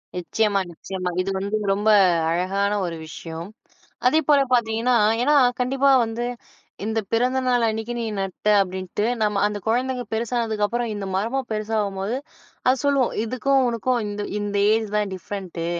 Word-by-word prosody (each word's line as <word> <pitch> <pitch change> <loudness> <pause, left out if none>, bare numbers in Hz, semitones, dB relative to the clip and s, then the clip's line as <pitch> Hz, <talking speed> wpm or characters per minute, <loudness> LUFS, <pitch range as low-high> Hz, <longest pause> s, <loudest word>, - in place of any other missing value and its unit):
நிச்சயமா, 200 +3 0
நிச்சயமா 185 +2 -5
இது 190 - -3
வந்து 200 +2 -2 0.2
ரொம்ப 205 +2 +1 0.4
அழகான 195 +4 0
ஒரு 170 -2 -4
விஷயம். 165 +1 -7 0.6
அதே 305 +5 +5
போல 290 -2 +6
பாத்தீங்கன்னா, 235 +1 +2 0.3
ஏன்னா 295 +3 +4 0.2
கண்டிப்பா 270 +2 +2
வந்து 225 +1 -4 0.6
இந்த 220 +1 -1
பிறந்த 250 +3 +2
நாள் 245 -2 +3
அன்னைக்கு 225 +2 -2
நீ 235 - -2
நட்ட 195 +2 -1
அப்டின்ட்டு 190 +2 -2 0.2
நம்ம 210 -2 +1
அந்த 210 0 -2
குழந்தைங்க 250 +2 0
பெருசானதுக்கு 225 -2 -1
அப்பறம் 235 +1 -2
இந்த 205 -1 -4
மரமும் 235 +7 -1
பெருசாகும்போது 210 0 -2 0.5
அது 255 - +5
சொல்லும், 275 -3 +2
"இதுக்கும் 260 +3 +1
உனுக்கும் 240 +2 0
இந்த 205 0 -4 0.2
இந்த 205 0 -3 0.2
ஏஜ் 220 -1 +1
தான் 210 -1 0
டிஃப்ரெண்ட்டு" 185 -3 -6
220 Hz, 145 wpm, -23 LUFS, 195-245 Hz, 0.6 s, போல